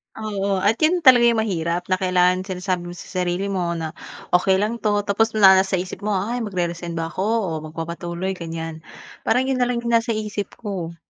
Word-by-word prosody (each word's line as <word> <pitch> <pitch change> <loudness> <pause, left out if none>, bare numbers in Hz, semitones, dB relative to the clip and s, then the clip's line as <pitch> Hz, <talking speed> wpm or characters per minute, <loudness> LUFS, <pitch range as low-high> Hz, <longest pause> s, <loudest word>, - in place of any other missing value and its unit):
Oo 200 -3 -2
at 220 +3 +2
'yun 340 +2 +2
talaga 245 -4 +7
'yung 230 -2 +3
mahirap 175 -3 -2
na 185 - +2
kailangan 185 0 +2
sinasabi 180 -1 -3
mo 175 - -8
sa - - -10
sarili 180 +2 -1
mo 175 -3 -1
na 160 -1 -4 0.4
"Okey 185 +2 +4
lang 215 +4 -1
'to" 205 -2 +1
tapos 220 +2 +1
na 190 -2 +7
nasa 190 0 +1
isip 180 0 -4
mo 210 0 -1
ay 220 +6 -1
mag-re-resign 175 -5 -3
ba 165 0 -3
ako - - -9 0.2
o 185 - -2 0.2
magpapatuloy 170 +3 -4
ganiyan, 165 -3 -6 0.5
parang 250 +3 +3
'yun 265 -1 -1
na 245 - +2
lang 240 -1 -2
'yung 235 - -1
nasa 230 0 +2
isip 210 -1 -4
ko. 185 -6 -5
190 Hz, 200 wpm, -22 LUFS, 175-215 Hz, 0.5 s, talaga